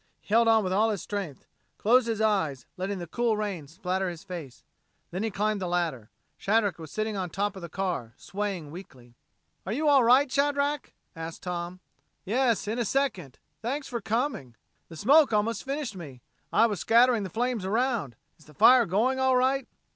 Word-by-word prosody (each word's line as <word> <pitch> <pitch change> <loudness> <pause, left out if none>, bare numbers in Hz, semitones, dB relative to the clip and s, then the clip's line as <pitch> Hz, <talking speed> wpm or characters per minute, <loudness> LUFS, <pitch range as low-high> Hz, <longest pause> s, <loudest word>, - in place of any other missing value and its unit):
He - - -26
held 230 0 +5
on 225 -1 +5
with 185 -1 -1
all 215 +3 +3
his 205 -4 -3
strength, 195 -10 -5 0.3
closed 240 +3 +3
his 225 -2 -1
eyes, 160 - 0
letting 190 +2 -3
the 175 - -5
cool 225 +6 0
rain 195 -8 -4
splatter 185 +4 -2
in 175 - -3
his 165 - -12
face. 170 -9 -8 0.5
Then 185 - -3
he 225 - 0
climbed 210 0 -1
the 185 - -2
ladder, 165 -11 -2 0.3
Shadrack 205 -4 +1
was 160 -2 -9
sitting 215 0 -2
on 185 -2 -3
the - - -28
top 205 +2 -1
of 190 - -9
the 170 - -7
car, 170 -11 -3
swaying 195 -7 -4
weakly. 130 -9 -12 0.5
"Are 190 - -5
you 300 +7 0
all 280 -3 +6
right, 255 +5 +5
Shadrack?" 285 0 0 0.2
asked 165 0 -7
Tom. 180 0 -5 0.4
"Yes 230 0 +1
in 225 +3 -2
a - - +2
second. 205 - -1 0.2
Thanks 270 +6 -3
for 235 -2 -4
coming. 220 - -2 0.3
The 165 - -10
smoke 270 - +5
almost 215 +2 0
finished 275 -5 -3
me. 140 -9 -10 0.3
I 225 - +5
was 210 -5 -1
scattering 235 +2 +4
the 195 - -4
flames 235 +1 -1
around. 220 - -1 0.2
Is 155 - -19
the 150 - -18
fire 245 - +6
going 235 +9 +1
all 260 -1 +3
right?" 265 +1 +1
205 Hz, 195 wpm, -27 LUFS, 175-240 Hz, 0.5 s, all